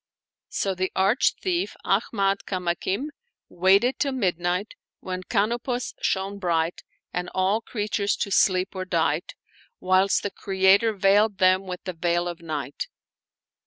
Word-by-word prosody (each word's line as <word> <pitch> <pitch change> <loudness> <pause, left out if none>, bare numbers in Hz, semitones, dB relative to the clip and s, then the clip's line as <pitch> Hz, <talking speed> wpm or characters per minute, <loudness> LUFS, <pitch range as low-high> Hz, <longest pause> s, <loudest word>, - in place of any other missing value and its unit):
So 195 - -1
the 185 0 -2
arch 195 +7 +3
thief 365 0 -1
Ahmad 195 -2 +1
Kamakim 185 - -2 0.4
waited 195 +8 +3
till 275 -2 0
midnight, 180 -3 -1 0.3
when 185 0 -5
Canopus 235 +5 -1
shone 195 +1 -1
bright,^ 170 -2 0 0.3
and 180 0 -3
all 190 +4 +2
creatures 210 -3 -1
to 200 - -3
sleep 185 0 +3
were 185 -1 -3
dight, 185 - -1 0.4
whilst 185 +1 +2
the 205 - -2
Creator 195 +3 +3
veiled 200 +1 +3
them 185 +1 +3
with 180 -1 -6
the 185 - -4
veil 175 +1 0
of 175 -1 -6
night. 150 -4 -4
190 Hz, 130 wpm, -25 LUFS, 180-205 Hz, 0.4 s, arch